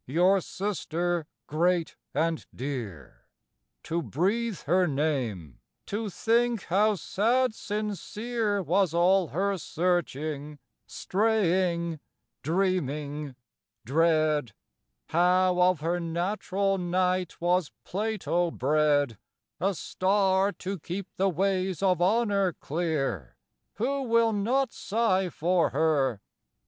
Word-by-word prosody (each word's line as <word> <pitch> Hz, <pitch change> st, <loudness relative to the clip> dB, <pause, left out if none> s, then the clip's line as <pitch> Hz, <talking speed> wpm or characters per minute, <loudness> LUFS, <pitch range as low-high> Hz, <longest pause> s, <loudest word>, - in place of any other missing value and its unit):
your 180 Hz, +7 st, +3 dB
sister 175 Hz, -4 st, -2 dB, 0.2 s
great 170 Hz, +2 st, 0 dB, 0.2 s
and 160 Hz, +2 st, -1 dB
dear. 115 Hz, -, -6 dB, 0.6 s
To 170 Hz, +1 st, -2 dB
breathe 200 Hz, -, -1 dB
her 180 Hz, +4 st, +2 dB
name, 130 Hz, -, -2 dB, 0.3 s
to 210 Hz, +1 st, -3 dB
think 230 Hz, +2 st, +1 dB
how 210 Hz, +4 st, +2 dB
sad 230 Hz, +7 st, +1 dB
sincere 210 Hz, 0 st, -2 dB
Was 180 Hz, 0 st, +1 dB
all 180 Hz, +1 st, +4 dB
her 195 Hz, +5 st, -1 dB
searching, 155 Hz, -4 st, -2 dB, 0.3 s
straying, 180 Hz, -6 st, 0 dB, 0.4 s
dreaming, 150 Hz, -5 st, -1 dB, 0.5 s
dread, 155 Hz, -3 st, +2 dB, 0.6 s
How 180 Hz, +2 st, +3 dB
of 180 Hz, -3 st, +3 dB
her 170 Hz, +3 st, 0 dB
natural 190 Hz, +3 st, -1 dB
night 180 Hz, 0 st, 0 dB
was 175 Hz, -2 st, +1 dB
Plato 200 Hz, -4 st, -1 dB
bred, 145 Hz, -4 st, +1 dB, 0.4 s
A 195 Hz, +2 st, 0 dB
star 190 Hz, +2 st, +1 dB
to 190 Hz, 0 st, -5 dB
keep 180 Hz, +5 st, -5 dB
the 195 Hz, +1 st, +2 dB
ways 190 Hz, 0 st, 0 dB
of 180 Hz, -3 st, +2 dB
honor 200 Hz, -2 st, +2 dB
clear, 145 Hz, -, -2 dB, 0.4 s
Who 275 Hz, +6 st, -1 dB
will 230 Hz, -3 st, +3 dB
not 240 Hz, +5 st, 0 dB
sigh 195 Hz, -4 st, 0 dB
for 175 Hz, +1 st, +1 dB
her? 140 Hz, -7 st, +1 dB
180 Hz, 100 wpm, -27 LUFS, 155-200 Hz, 0.6 s, all